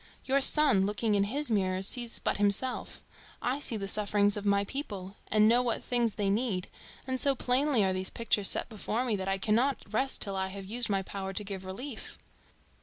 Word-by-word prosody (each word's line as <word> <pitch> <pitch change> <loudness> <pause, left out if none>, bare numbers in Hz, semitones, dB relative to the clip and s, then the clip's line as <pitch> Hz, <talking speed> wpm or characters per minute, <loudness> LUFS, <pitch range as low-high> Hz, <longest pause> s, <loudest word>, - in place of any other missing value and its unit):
Your 275 +1 +2
son, 280 -8 +5
looking 210 +1 -1
in 200 -1 +2
his 280 +5 -2
mirror, 190 -2 0
sees 240 +3 0
but - - -1
himself; 205 +5 0 0.4
I 255 +3 -1
see 235 -6 0
the 195 -1 -4
sufferings 205 0 +2
of 205 -1 -4
my 200 0 +3
people 200 -6 -6
and 215 0 +4
know 240 +2 +4
what 240 -2 -2
things 240 -3 0
they 200 -2 0
need, 200 -4 -1 0.4
and 260 -1 -2
so 275 -1 +3
plainly 255 -1 +2
are 190 -1 +1
these 185 0 +1
pictures 215 -3 +1
set - - -2
before 225 +2 -3
me 230 -4 0
that 190 -1 -4
I 195 0 0
cannot 230 +8 +1
rest 265 +5 +2
till 195 -1 -5
I 190 0 -1
have 195 0 -8
used 230 +4 -1
my 195 -1 0
power 195 0 -5
to 210 - 0
give 195 -2 -6
relief." 230 +6 -7
210 Hz, 205 wpm, -30 LUFS, 195-245 Hz, 0.4 s, son